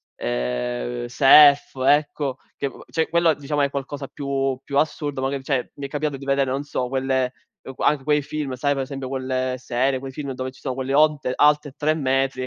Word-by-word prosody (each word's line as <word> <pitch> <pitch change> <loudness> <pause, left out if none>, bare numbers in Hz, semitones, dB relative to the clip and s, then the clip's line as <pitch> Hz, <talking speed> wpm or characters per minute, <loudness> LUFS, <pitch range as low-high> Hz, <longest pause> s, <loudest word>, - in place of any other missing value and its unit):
Ehm, - - -3
Surf 145 - +6
ecco, 145 -2 +2 0.2
che 140 -1 -3 0.2
cioè 160 0 0
quello 170 -1 +3
diciamo 145 0 -2
è 140 -1 +1
qualcosa 140 0 -5
più 135 -2 -2
più 140 - -3
assurdo, 145 -2 -1
magari 135 0 -2
cioè 135 -3 -1
mi 140 -1 -5
è - - -22
capitato 145 0 -2
di 135 - -10
vedere 135 -1 +1
non 135 +2 -1
so 130 -3 -3
quelle 130 -1 0 0.5
anche 145 -2 +1
quei 150 +1 +2
film, 150 -1 -4
sai 145 +3 +1
per 135 -1 -2
esempio 135 0 -6
quelle 130 -1 -2
serie, 130 +1 0
quei 135 0 -7
film 140 0 -5
dove 130 0 -5
ci 130 - -19
sono 130 -3 -4
quelle 135 +1 -3
onte 150 -3 +3
alte 150 0 +3
3 155 +1 +1
metri 135 -2 0
135 Hz, 190 wpm, -23 LUFS, 130-145 Hz, 0.5 s, Surf